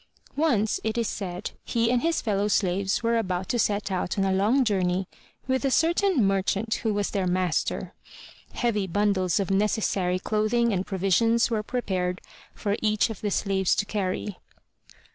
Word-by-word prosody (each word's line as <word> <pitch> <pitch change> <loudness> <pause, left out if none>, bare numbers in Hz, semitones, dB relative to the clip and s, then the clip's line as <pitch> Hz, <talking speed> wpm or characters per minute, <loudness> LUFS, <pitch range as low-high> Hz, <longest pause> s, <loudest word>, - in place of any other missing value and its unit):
Once, 245 -9 +1
it 220 +1 -2
is 230 -2 +1
said, 185 -1 -4
he 230 -1 +1
and 245 -1 +2
his 330 0 0
fellow 205 -2 0
slaves 195 +1 0
were 230 0 +2
about 185 -3 -2
to 240 - -1
set 205 -2 0
out 180 0 -2
on 195 - +2
a 190 0 +1
long 220 +8 +3
journey 185 -3 0 0.4
with 260 +1 0
a 275 - +2
certain 335 - +2
merchant 195 +3 0
who 220 - 0
was 205 -1 -1
their 195 -3 -1
master. 180 -2 -1 0.6
Heavy 210 -5 0
bundles 190 -1 +1
of 195 -1 -1
necessary 195 -2 +1
clothing 215 +4 +1
and 190 0 -2
provisions 210 +5 +2
were 220 -2 +1
prepared 190 -6 -2 0.4
for 205 -1 -1
each 215 +1 +2
of 215 - -8
the 210 - -1
slaves 195 -2 +1
to 205 - 0
carry. 200 -1 -3
205 Hz, 165 wpm, -26 LUFS, 190-230 Hz, 0.6 s, long